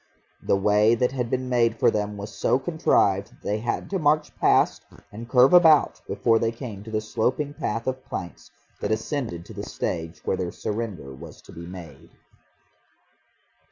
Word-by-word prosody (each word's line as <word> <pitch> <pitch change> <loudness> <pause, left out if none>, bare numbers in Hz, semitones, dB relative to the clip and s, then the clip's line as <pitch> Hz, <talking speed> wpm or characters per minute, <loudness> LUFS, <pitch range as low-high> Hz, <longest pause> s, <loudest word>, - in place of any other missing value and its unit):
The - - +2
way 105 +3 +4
that 125 +2 +1
had 125 -3 -3
been 130 +1 -1
made 115 -2 +2
for - - +4
them 105 -1 -2
was 100 +1 -7
so 100 - +1
contrived 130 - +1
that - - -23
they 105 +1 -1
had 120 +2 -3
to 195 - 0
march 150 0 +1
past - - +3 0.3
and 115 +3 -9
curve 130 +3 +5
about 160 -4 +6
before 115 -2 +2
they 115 0 0
came 115 -4 -8
to 110 - -10
the 110 -1 -1
sloping 130 +7 -1
path 115 -4 -3
of 130 0 -3
planks 90 -2 -7 0.3
that - - -2
ascended 110 - -3
to - - -11
the - - -6
stage 80 -1 -4
where - - 0
their 90 -2 -3
surrender 105 -11 -5
was 75 +4 -11
to - - -14
be 85 +1 -9
made. 85 -6 -11
110 Hz, 180 wpm, -25 LUFS, 100-130 Hz, 0.3 s, about